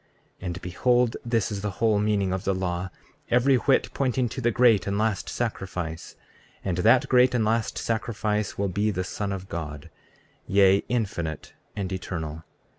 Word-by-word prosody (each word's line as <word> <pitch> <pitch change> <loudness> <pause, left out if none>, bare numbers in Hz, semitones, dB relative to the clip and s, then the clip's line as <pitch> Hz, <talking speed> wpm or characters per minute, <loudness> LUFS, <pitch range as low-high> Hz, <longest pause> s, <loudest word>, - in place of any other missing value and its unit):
34:14 - - -9
And 90 +1 -4
behold, 120 +7 +2
this 115 -2 0
is 100 -1 -3
the 105 - -2
whole 110 -2 +3
meaning 100 -3 +1
of 95 0 -3
the 100 -2 0
law, 90 0 -2 0.4
every 125 +2 +4
whit 135 +2 +2
pointing 130 -2 0
to 130 - -5
that 120 - +3
great 115 -3 +4
and 100 0 0
last 110 -1 0
sacrifice; 90 -8 -4 0.5
and 90 -3 -1
that 115 +6 +5
great 125 0 +4
and 115 -3 +2
last 115 0 0
sacrifice 105 -2 -2
will 100 - 0
be 100 +3 0
the 95 -3 -1
Son 100 +2 -4
of 95 -1 -5
God, 75 -4 -6 0.6
yea, 100 0 +4
infinite 95 - -2 0.2
and 95 -2 -3
eternal. 80 -4 -5
100 Hz, 170 wpm, -26 LUFS, 90-115 Hz, 0.6 s, that